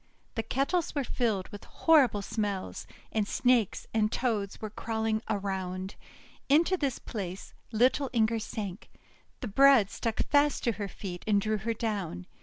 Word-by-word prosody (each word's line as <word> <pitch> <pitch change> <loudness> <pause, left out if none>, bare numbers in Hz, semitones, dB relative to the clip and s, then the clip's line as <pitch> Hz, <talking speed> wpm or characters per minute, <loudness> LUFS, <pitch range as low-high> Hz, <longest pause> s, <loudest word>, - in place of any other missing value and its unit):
The 225 - -1
kettles 285 +9 -1
were 285 - +1
filled 220 -7 -1
with 205 - -9
horrible 265 -11 +3
smells, 205 -3 -3 0.2
and 215 -2 0
Snakes 245 -5 +2
and 215 -1 +2
Toads 215 -6 -1
were 215 -1 -5
crawling 220 0 -1
around. 190 -2 -3 0.6
Into 330 +6 +4
this 280 -7 -1
place 190 -3 -6 0.2
little 255 +4 +3
Inger 225 -1 +2
sank; 210 -2 -6 0.5
the 245 - -3
bread 255 -1 +6
stuck 230 -2 -2
fast 290 0 +3
to 235 - +2
her 205 -2 -4
feet, 180 -2 -7
and 205 -2 +4
drew 215 +1 -1
her 225 +3 -2
down. 200 - -3
220 Hz, 150 wpm, -29 LUFS, 200-250 Hz, 0.6 s, bread